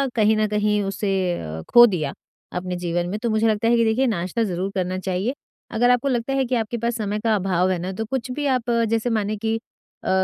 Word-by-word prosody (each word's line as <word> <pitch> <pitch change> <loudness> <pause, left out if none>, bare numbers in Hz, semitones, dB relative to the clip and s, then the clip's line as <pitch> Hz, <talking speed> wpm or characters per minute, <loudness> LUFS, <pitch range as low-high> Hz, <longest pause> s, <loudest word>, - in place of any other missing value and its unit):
कहीं 220 -1 +4
न 215 - +2
कहीं 210 0 +1
उसे 195 +1 -2 0.3
अ, 80 0 -6
खो 240 0 +9
दिया 165 -10 -1 0.5
अपने 180 0 -4
जीवन 175 0 -2
में, 205 - -2
तो 235 - -1
मुझे 220 +1 +2
लगता 220 +1 +1
है 235 - +4
कि 230 - +4
देखिए 235 +4 +2
नाश्ता 205 +1 -1
ज़रूर 185 -1 -2
करना 185 -1 -1
चाहिए। 190 +6 -1 0.4
अगर 240 +2 +3
आपको 245 +2 +3
लगता 250 0 0
है 270 -1 +1
कि 250 0 -1
आपके 230 +1 -1
पास 235 +1 -1
समय 210 -1 -2
का 220 0 +2
अभाव 185 -2 +1
है 185 - 0
ना, 180 +2 -4
तो 220 +3 -3
कुछ 255 +1 -3
भी 290 +3 -3
आप 245 -1 -3 0.2
जैसे 230 +2 0
माने 215 -2 -1
कि 220 +1 -1 0.5
अ, - - -3
215 Hz, 235 wpm, -23 LUFS, 185-235 Hz, 0.5 s, खो